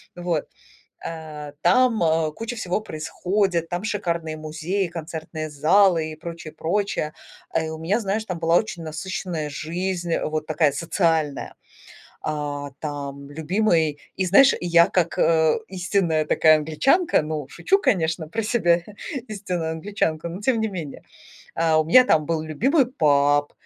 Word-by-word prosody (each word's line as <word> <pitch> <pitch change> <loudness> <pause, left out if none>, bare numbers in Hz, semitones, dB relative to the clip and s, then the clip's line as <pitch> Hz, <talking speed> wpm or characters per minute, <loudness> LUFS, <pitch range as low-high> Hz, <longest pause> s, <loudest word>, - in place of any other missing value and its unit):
вот. 175 -3 -2 0.6
Э, 155 -3 -7
там 230 +5 +3 0.3
куча 230 +2 -5
всего 185 0 -1
происходит, 175 0 -1
там 175 +2 -3
шикарные 170 -7 -2
музеи, 160 +5 -2
концертные 160 -1 -6
залы 160 +2 +3
и - - -8
прочее, 165 -1 -8
прочее. 175 -3 -1 0.4
А, 165 - 0
и 160 - -4
у 160 - -6
меня, 190 +8 0
знаешь, 210 +2 -2
там 180 -4 -4
была 165 +1 +3
очень 190 -6 -3
насыщенная 160 -1 -4
жизнь, 170 +3 -3
вот 155 0 -2
такая 155 -2 +2
социальная. 160 -3 0 0.7
А 145 -2 -3
там 140 -2 -6
любимый 160 -1 +1 0.2
и, 190 - 0
знаешь, 255 +10 +6
я 170 -1 +5
как 175 -3 0 0.5
истинная 180 -4 0
такая 155 +1 +5
англичанка, 210 - +2
ну, 150 -3 -4
шучу, 390 - +2
конечно, 165 - 0
про 225 +3 -2
себя 175 -7 +2 0.5
истинную 180 -6 -3
англичанку, 165 -2 -2
но 175 - -6
тем 230 0 +1
не 220 - 0
менее. 165 -8 -7 0.5
А, 160 -1 +3
у 155 - 0
меня 255 +10 +7
там 155 -8 +2
был 165 -2 -1
любимый 250 - +2
паб, 145 - +2
165 Hz, 140 wpm, -23 LUFS, 155-195 Hz, 0.7 s, меня